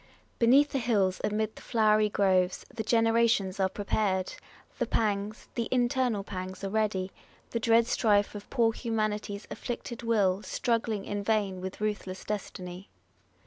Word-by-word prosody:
Beneath 270 +5 +5
the 275 - 0
hills, 205 -6 +1
amid 215 +1 -1
the - - -12
flowery 215 -2 +3
groves, 185 -3 +2
The 235 - -3
generations 225 -3 +2
are 190 -1 +2
prepar'd; 195 -2 -1 0.5
the - - 0
pangs, 210 -1 -1
The 235 -2 -2
internal 245 -4 +1
pangs, 185 -1 -6
are 195 - -3
ready; 200 -3 0 0.4
the 230 - -1
dread 230 0 +4
strife 205 -3 +2
Of 205 -1 -9
poor 230 -4 +2
humanity's 215 -3 -2
afflicted 240 -1 -5
will 205 -5 +2
Struggling 220 0 -1
in 205 0 -3
vain 200 -4 0
with 190 0 -6
ruthless 205 -3 -3
destiny. 185 -2 -6
210 Hz, 145 wpm, -29 LUFS, 195-230 Hz, 0.5 s, Beneath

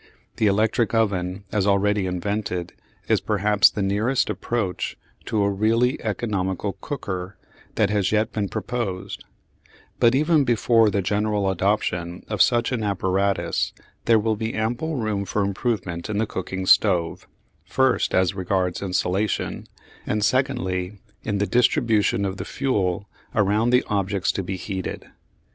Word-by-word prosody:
The 110 - +3
electric 110 +3 +1
oven, 95 -3 0
as 105 -2 +1
already 100 0 +2
invented, 90 -1 -3 0.3
is - - +2
perhaps 105 0 +4
the 100 - -3
nearest 105 +7 +1
approach 105 -7 -3 0.3
to 105 -2 0
a 100 - +2
really 115 +5 +1
economical 100 -3 -2
"cooker" 95 -9 -5 0.4
that 105 -1 +2
has 100 -3 +1
yet 110 +2 +1
been 105 -3 -2
proposed; 100 -7 -4 0.8
but 120 +1 +5
even 155 +1 +3
before 115 -2 +3
the 100 -1 0
general 105 0 0
adoption 90 -2 -1
of 105 -4 0
such 120 0 +3
an 125 -3 -1
apparatus 100 0 0 0.3
there 115 -1 +5
will 110 +1 +1
be 110 +2 -3
ample 120 +9 -1
room 110 -5 -1
for 100 +1 -1
improvement 100 -4 -2
in 105 - -2
the 110 - +1
cooking 95 -1 -4
stove, 90 -5 +3 0.4
first 130 -1 +1
as 95 0 +3
regards 95 -1 -1
insulation, 95 +1 -1 0.4
and 105 0 +1
secondly 105 -8 0 0.2
in 105 -2 -2
the 100 - +1
distribution 110 -4 +2
of 95 0 -3
the - - -4
fuel 100 -7 -1 0.3
around 105 +2 +2
the 125 0 +4
objects 100 -1 0
to - - -3
be 95 0 -4
heated. 95 -1 -5
105 Hz, 140 wpm, -23 LUFS, 95-110 Hz, 0.8 s, but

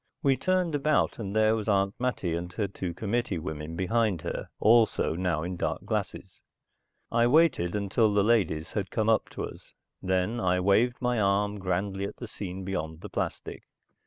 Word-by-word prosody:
We 135 -2 +4
turned 180 +4 0
about 145 -1 +1
and 100 -2 -4
there 110 0 +4
was 110 -1 -4
Aunt 100 -1 +2
Mattie 125 -9 -1
and 85 +1 -4
her 105 -3 -1
two 95 -2 -5
committee 105 +2 -2
women 80 -1 -5
behind 100 0 0
her - - -4
also 110 -5 +4
now 85 -2 -1
in 90 +1 -4
dark - - -2
glasses. - - -4 0.7
I 115 0 +3
waited 130 - +3
until 105 +2 +2
the 100 -1 +3
ladies 95 -8 +1
had 100 -3 -2
come 110 0 0
up 110 - +2
to - - -6
us, - - -9 0.3
then 95 +5 0
I 90 -3 +2
waved 110 +6 +3
my 125 -2 +1
arm 100 +1 +1
grandly 95 +1 -2
at - - -6
the 120 - -7
scene 95 -3 -6
beyond 80 -4 -4
the - - -8
plastic. - - -4
100 Hz, 180 wpm, -28 LUFS, 90-115 Hz, 0.7 s, We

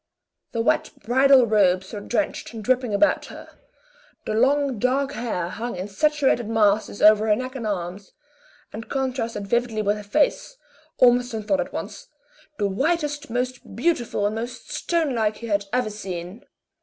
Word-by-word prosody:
The 230 - -1
wet - - +1 0.2
bridal 260 +2 +5
robes 190 -3 +2
were 210 - -4
drenched 240 +5 -2
and 220 -2 -7
dripping 255 0 +1
about 205 +10 +2
her, - - -11 0.8
the - - -2
long 270 +1 +2
dark 270 +4 +1
hair 220 -10 -3
hung 230 +5 -5
in 185 +2 -5
saturated 270 0 +1
masses 215 -2 +1
over 215 +1 +6
her 210 - +4
neck 255 +3 -5
and 230 -4 -4
arms, 190 0 -4 0.6
and 225 +2 -8
contrasted 250 -6 -2
vividly 230 0 0
with 205 +1 0
a - - -8
face, 310 - 0 0.4
Ormiston 245 -3 +3
thought 280 +7 +1
at - - -5
once, - - -7 0.5
the 205 - 0
whitest, 295 - -1
most 245 -2 -4
beautiful, 240 -6 0
and 205 - 0
most 240 +3 -6
stonelike 250 -11 0
he 235 - -8
had 200 -2 0
ever 250 -3 0
seen. 185 0 -7
230 Hz, 155 wpm, -23 LUFS, 210-260 Hz, 0.8 s, over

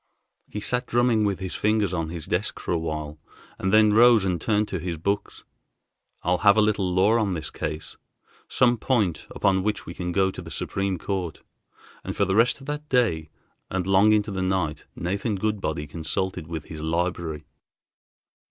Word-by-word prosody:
He 105 - -5
sat 125 +4 0
drumming 120 -2 +2
with 100 -2 0
his 95 -1 -5
fingers 105 -3 +1
on 80 -3 -2
his 85 -2 -6
desk - - -2
for - - -4
a 85 - +2
while, 75 -2 -4 0.4
and 95 - 0
then 110 0 +5
rose 115 -2 +6
and 90 -3 -1
turned 105 -1 +1
to 95 - -3
his 85 0 -4
books. 100 +6 -2 0.8
"I'll 90 +1 +1
have 100 0 +5
a - - +6
little 100 -3 +1
law 100 +6 +4
on 100 -4 0
this 80 -2 -5
case, 80 0 -5 0.5
some 120 -1 +3
point 105 -11 0
upon 95 -1 +1
which 105 +2 -2
we 85 - -7
can 90 0 -4
go 95 +1 +2
to - - -8
the - - -10
Supreme 95 -1 -2
Court," 90 -3 -4 0.6
and - - -5
for 100 - +3
the 95 0 0
rest 115 +5 +3
of - - -11
that 150 +1 -5
day 85 - +1 0.4
and 95 -1 -2
long 95 +2 +5
into 105 -1 +2
the 95 -1 -2
night 95 -5 -1
Nathan 100 +5 -2
Goodbody 95 -7 -2
consulted 80 +2 -3
with 80 -2 -5
his 80 - -9
library. 80 -1 -2
95 Hz, 185 wpm, -25 LUFS, 85-105 Hz, 0.8 s, rose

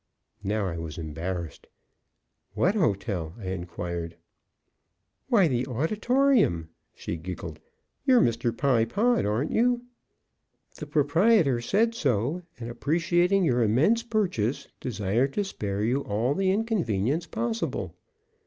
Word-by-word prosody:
Now 105 +1 0
I 85 -3 -3
was 80 -2 -6
embarrassed. 85 +1 -5 0.9
"What 185 - +2
hotel?" 100 - -1
I 95 -5 -6
inquired. 85 -2 -5 1.1
"Why, 220 -9 +4
the 125 -3 -1
Auditorium!" 210 - +2 0.3
she 85 - -5
giggled. 90 +2 -7 0.4
"You're 260 -3 +5
Mr. 115 - +1
Pye 125 -3 +2
Pod, 225 - +1
aren't 115 +9 0
you? 245 +1 +2 0.9
The 150 - -7
proprietor 150 - +3
said 220 - +2
so, 140 - 0 0.2
and 115 - -5
appreciating 175 +9 +1
your 125 -7 +2
immense 135 - +3
purchase, 190 - -1
desired 115 +4 0
to 205 - 0
spare 105 - -3
you 125 +5 +1
all 115 +4 0
the 190 +3 +1
inconvenience 170 - 0
possible." 230 +3 -3
130 Hz, 115 wpm, -27 LUFS, -, 1.1 s, You're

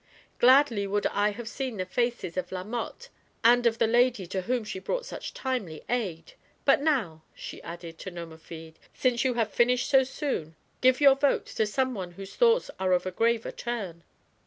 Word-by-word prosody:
Gladly 250 -5 +5
would 205 +1 -1
I 205 +1 +2
have 225 +2 -7
seen 255 -1 -4
the 185 - -2
faces 235 -3 -2
of 185 -1 -3
La 185 -1 -4
Mothe 235 - -5 0.4
and 240 +1 +5
of 230 -1 +1
the - - +3
lady 240 -2 +2
to 190 +2 -3
whom 245 +4 -1
she 205 -3 -6
brought - - -3
such - - -6
timely 230 - -4
aid. 185 -10 -3 0.3
But 275 0 +5
now," 245 - 0
she - - -8
added 170 -1 -9
to - - -6
Nomerfide, 165 -1 -10
" - - -40
since 245 -2 +2
you 255 -2 +1
have 225 -3 0
finished 245 +1 +2
so 270 -1 +5
soon, 255 - -4 0.3
give 255 +2 +4
your 280 -1 +8
vote 275 +1 +1
to 220 - +1
some 260 +4 0
one 185 -5 -6
whose 195 +2 -10
thoughts 480 0 +3
are 185 -1 +2
of 180 0 +1
a 185 - -2
graver 230 +3 +1
turn." 200 -9 -5
225 Hz, 195 wpm, -27 LUFS, 185-255 Hz, 0.4 s, your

